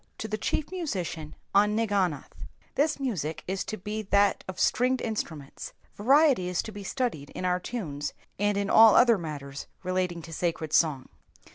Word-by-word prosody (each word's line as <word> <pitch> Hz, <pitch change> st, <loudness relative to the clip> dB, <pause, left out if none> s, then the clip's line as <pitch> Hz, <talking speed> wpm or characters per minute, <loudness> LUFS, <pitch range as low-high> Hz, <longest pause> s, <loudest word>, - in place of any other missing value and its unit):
^To 220 Hz, -, -4 dB
the 215 Hz, -, -2 dB
Chief 300 Hz, -, -1 dB
Musician 185 Hz, -, -4 dB, 0.2 s
on 210 Hz, +1 st, +4 dB
Nsginoth. 195 Hz, -9 st, 0 dB, 0.4 s
The 300 Hz, +2 st, +1 dB
music 160 Hz, -, -3 dB
toas 190 Hz, +1 st, -2 dB
to 215 Hz, -, -4 dB
be 215 Hz, +3 st, -4 dB
ihat 200 Hz, 0 st, +3 dB
of 185 Hz, -1 st, -6 dB
stringed 255 Hz, +2 st, +2 dB
in 225 Hz, -, -2 dB
struments. 155 Hz, -9 st, -6 dB, 0.2 s
Variety 270 Hz, -, +4 dB
is 180 Hz, -, -1 dB
to 220 Hz, -, -7 dB
be 205 Hz, -1 st, -8 dB
studied 195 Hz, -, -2 dB
in 185 Hz, -, -3 dB
our 180 Hz, 0 st, +1 dB
tunes, 160 Hz, -10 st, -4 dB, 0.3 s
and 205 Hz, 0 st, +1 dB
in 200 Hz, 0 st, 0 dB
all 220 Hz, 0 st, +7 dB
other 235 Hz, -4 st, +6 dB
matters 140 Hz, -4 st, -6 dB, 0.2 s
relating 180 Hz, -2 st, -1 dB
to 165 Hz, -, -9 dB
sacred 160 Hz, -2 st, -2 dB
song. 150 Hz, -6 st, +2 dB
195 Hz, 170 wpm, -28 LUFS, 165-220 Hz, 0.4 s, all